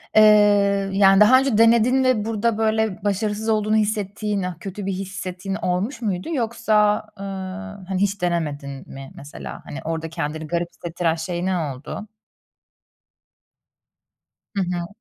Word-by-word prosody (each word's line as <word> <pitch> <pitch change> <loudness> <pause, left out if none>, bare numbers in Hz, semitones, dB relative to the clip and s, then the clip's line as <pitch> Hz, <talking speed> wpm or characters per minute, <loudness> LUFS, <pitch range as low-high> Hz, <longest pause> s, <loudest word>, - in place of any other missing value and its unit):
Eee, 205 -2 +5
yani, 195 0 +6
daha 255 +5 +7
önce 265 -5 +1
denedin 235 +3 +5
ve 250 -5 +2
burada 225 0 0
böyle 220 -3 0
başarısız 210 +2 -1
olduğunu 215 0 +2
hissettiğin, 210 -1 -1
ııı, 180 -1 -3
kötü 195 +2 -6
bir 195 - -1
hissettiğin 190 0 -5
olmuş 200 +9 -2
muydu 195 - -2
yoksa, 220 -4 +2 0.2
ııı, 195 0 -6
hani 190 0 -2
hiç 200 0 0
denemedin 145 -6 -3
mi 135 0 -9
mesela? 145 - -9
Hani, 145 - -7
orada 160 0 -3
kendini 155 -1 -4
garip 170 +2 -1
hissettiren 170 -1 -2
şey 175 +2 -3
ne 190 -1 +1
oldu? 150 +7 -5 2.5
Hı 195 - +1
hı. 175 -1 -3
195 Hz, 135 wpm, -22 LUFS, 175-215 Hz, 2.5 s, daha